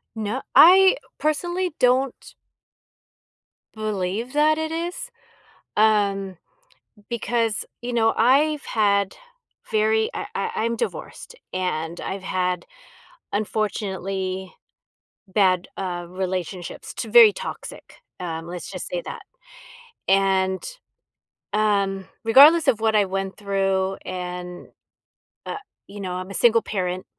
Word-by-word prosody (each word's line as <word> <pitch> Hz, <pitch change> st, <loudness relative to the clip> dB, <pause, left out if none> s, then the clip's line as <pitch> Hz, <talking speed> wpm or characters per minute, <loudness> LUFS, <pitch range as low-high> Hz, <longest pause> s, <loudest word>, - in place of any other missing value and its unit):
No 220 Hz, +4 st, -3 dB
I 380 Hz, +5 st, +8 dB, 0.2 s
personally 345 Hz, +3 st, -1 dB
don't 255 Hz, +1 st, +1 dB, 1.4 s
believe 215 Hz, +2 st, -3 dB
that 305 Hz, +1 st, +3 dB
it 315 Hz, 0 st, -2 dB
is, 345 Hz, +8 st, -4 dB, 0.7 s
um, 200 Hz, -3 st, +2 dB, 0.7 s
because, 230 Hz, -1 st, -1 dB, 0.2 s
you 245 Hz, +1 st, -5 dB
know, 225 Hz, -1 st, +3 dB
I've 285 Hz, +5 st, +3 dB
had 200 Hz, -2 st, +1 dB, 0.6 s
very 220 Hz, +1 st, +2 dB
I -, -, -4 dB
I 195 Hz, -, -2 dB
I'm 230 Hz, +1 st, 0 dB
divorced, -, -, -5 dB, 0.2 s
and 170 Hz, -2 st, -3 dB
I've 195 Hz, 0 st, -5 dB
had, 180 Hz, -1 st, -1 dB, 0.7 s
unfortunately, 195 Hz, -3 st, -3 dB, 0.7 s
bad, 185 Hz, -2 st, +2 dB
uh, 175 Hz, -2 st, -4 dB
relationships 185 Hz, -1 st, -5 dB
t -, -, -4 dB
very 460 Hz, -3 st, +9 dB
toxic, -, -, -8 dB, 0.2 s
um, 165 Hz, -2 st, -5 dB
let's 175 Hz, 0 st, -7 dB
just -, -, -6 dB
say -, -, -2 dB
that. -, -, -7 dB, 0.9 s
And, 190 Hz, -1 st, +2 dB, 0.9 s
um, 200 Hz, -2 st, +1 dB, 0.2 s
regardless 285 Hz, +8 st, +7 dB
of 220 Hz, -, +3 dB
what 220 Hz, -1 st, +2 dB
I 205 Hz, -, +4 dB
went 195 Hz, 0 st, -3 dB
through 195 Hz, -1 st, 0 dB
and, 180 Hz, -1 st, -6 dB, 0.8 s
uh -, -, -4 dB, 0.3 s
you 205 Hz, +1 st, -9 dB
know, 185 Hz, -2 st, -4 dB
I'm 185 Hz, +1 st, -6 dB
a -, -, -7 dB
single 230 Hz, +1 st, +4 dB
parent 185 Hz, -2 st, -3 dB
200 Hz, 110 wpm, -23 LUFS, 190-235 Hz, 1.4 s, very